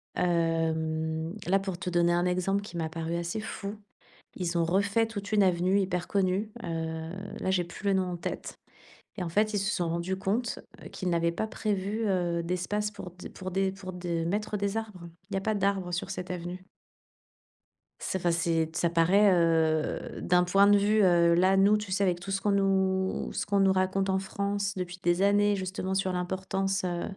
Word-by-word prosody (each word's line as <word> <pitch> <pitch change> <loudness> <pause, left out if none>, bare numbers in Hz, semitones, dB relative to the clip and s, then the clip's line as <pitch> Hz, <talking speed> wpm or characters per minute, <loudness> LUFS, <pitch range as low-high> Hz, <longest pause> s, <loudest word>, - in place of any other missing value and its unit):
Hem, 160 -1 0
là, 195 +3 +3
pour 190 -2 -4
te 180 +1 -4
donner 175 0 +3
un 175 +1 +2
exemple 185 +2 +1
qui 205 - -10
m'a 160 -2 -2
paru 165 +1 -3
assez 170 +5 -2
fou, 210 -1 -5 0.6
ils 175 -2 -1
ont 170 - +3
refait 200 +6 +2
toute 205 -2 -6
une 210 -1 +5
avenue 185 +2 +3
hyper 180 -2 -1
connue, 195 +2 0
heu, 160 -1 -3 0.3
là, - - -1
j'ai 180 -2 +2
plus 175 +4 -11
le 200 - +4
nom 190 -1 +2
en - - -3
tête 170 - -5 0.6
et - - -1
en 175 - -3
fait, 210 +5 +1
ils - - +2
se 200 +1 0
sont 175 -2 -1
rendus 170 +3 -2
compte, 210 +5 -1 0.2
heu, - - -8
qu'ils 185 - -4
n'avaient 170 0 +1
pas 195 +6 -2
prévu, 210 0 -2
heu, 175 -3 0
d'espace 185 +4 -1
pour 185 -3 -8
d 180 +1 -10
pour 185 0 -7
des 190 +1 0
pour 190 -1 -8
de 175 -2 -2
mettre 210 +4 -1
des 200 +1 -1
arbres. 205 -6 -5 0.2
Il 195 - -5
y - - +1
a 195 - 0
pas 215 +2 0
d'arbres 195 -2 0
sur 180 +2 -3
cette 185 -1 -5
avenue. 180 +1 -5 1.3
C'est 190 - -2
fa 175 -1 +1
c'est. 165 -1 0
Ça 170 +1 +2
paraît, 185 +5 +4
heu, 160 -3 +1
d'un 180 0 +3
point 195 +3 +4
de 205 0 +6
vue, 210 +1 +3
heu, 170 -2 +5
là, 185 +2 +4
nous, 200 +2 +5
tu 210 -2 -6
sais, 200 +2 +1
avec 180 -2 +1
tout 185 +3 -6
ce 195 - -1
qu'on 205 - +1
nous 190 -1 +1
ce - - -2
qu'on 200 -1 +1
nous 195 -1 +5
raconte 190 +1 +1
en 190 - +2
France 200 0 -2
depuis 180 -1 -5
des 175 +1 +2
années, 205 +1 +4
justement, 190 0 -3
sur 190 -1 0
l'importance, 190 +1 -1
heu, 175 -1 -2
185 Hz, 205 wpm, -28 LUFS, 175-200 Hz, 1.3 s, de